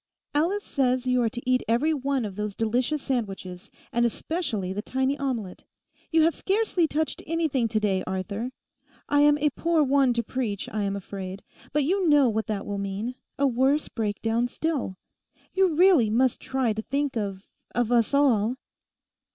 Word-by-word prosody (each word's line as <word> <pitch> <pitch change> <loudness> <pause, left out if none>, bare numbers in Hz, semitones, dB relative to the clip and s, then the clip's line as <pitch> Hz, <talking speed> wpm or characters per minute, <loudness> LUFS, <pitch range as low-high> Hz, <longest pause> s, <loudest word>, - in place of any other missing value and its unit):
'Alice 350 +8 +1
says 255 -2 0
you 250 -1 +2
are 230 - +2
to 240 +3 -8
eat 255 0 +3
every 255 +8 +2
one 275 -3 -1
of 200 -3 -6
those 210 -1 -3
delicious 245 +6 0
sandwiches, 195 -8 -4 0.2
and 235 - +2
especially 235 - -2
the 205 - -3
tiny 265 +4 0
omelette. 235 -9 -3 0.5
You 320 -1 +5
have 330 +1 +4
scarcely 390 -4 +1
touched 310 +1 -2
anything 310 -7 +1
to 215 0 0
day, 195 -3 0
Arthur. 200 +5 -3 0.6
I 290 0 +3
am 295 0 +5
a 295 0 +1
poor 330 +2 +2
one 275 -2 +3
to 235 0 -1
preach, 220 -5 -3
I 215 - -2
am 195 0 -1
afraid; 195 -1 -6 0.3
but 295 0 +2
you 365 +3 +1
know 290 -4 +5
what 220 +1 -1
that 210 -3 -3
will 200 -1 -3
mean—a 220 +8 -3
worse 270 +3 +2
breakdown 225 +2 -1
still. 270 - -2 0.6
You 380 -4 +3
really 340 - +5
must 250 +3 +2
try 260 -4 0
to 215 - -3
think 280 +3 -2
of—of 210 +3 -4
us 240 +3 +3
all. 245 -5 +3
250 Hz, 165 wpm, -26 LUFS, 215-290 Hz, 0.6 s, You